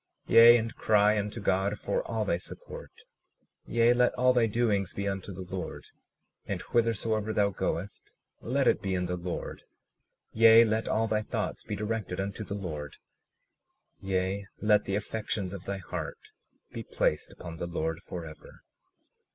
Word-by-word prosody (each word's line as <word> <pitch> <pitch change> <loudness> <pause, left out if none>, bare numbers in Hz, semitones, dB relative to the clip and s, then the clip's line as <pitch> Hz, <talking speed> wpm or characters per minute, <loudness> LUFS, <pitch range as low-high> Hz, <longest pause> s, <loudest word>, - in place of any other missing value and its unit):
37:36 - - -2
Yea, 120 +1 +10
and 115 0 -4
cry 105 0 +3
unto 105 +3 -4
God 100 +1 0
for - - -1
all - - -1
thy - - 0
support; 485 -2 -10 0.6
yea, 120 +1 +4
let 125 0 +3
all 125 0 +4
thy 120 -2 +3
doings 105 -4 0
be 100 0 -2
unto 95 0 -4
the 95 0 -7
Lord, 90 0 -6 0.6
and - - -2
whithersoever 110 -2 0
thou 100 -1 +2
goest 95 +1 -4 0.3
let - - 0
it - - +3
be 95 -1 -1
in 90 0 -1
the 90 0 -2
Lord; 90 0 -5 0.7
yea, 115 +1 +8
let 110 0 -1
all 110 +1 +1
thy 110 -1 0
thoughts - - -3
be - - -4
directed 105 -4 -3
unto 100 +2 -3
the 100 - -5
Lord; 75 -7 -6 1.0
yea, 95 +1 -1
let 105 -1 +3
the 100 - -1
affections 105 -2 -3
of 95 -3 -8
thy 100 - -3
heart 85 -5 -5 0.5
be - - -6
placed 75 - -1
upon 85 -2 -9
the 85 - -4
Lord 80 -1 -3
forever. 80 -3 -10
100 Hz, 160 wpm, -29 LUFS, 95-115 Hz, 1.0 s, Yea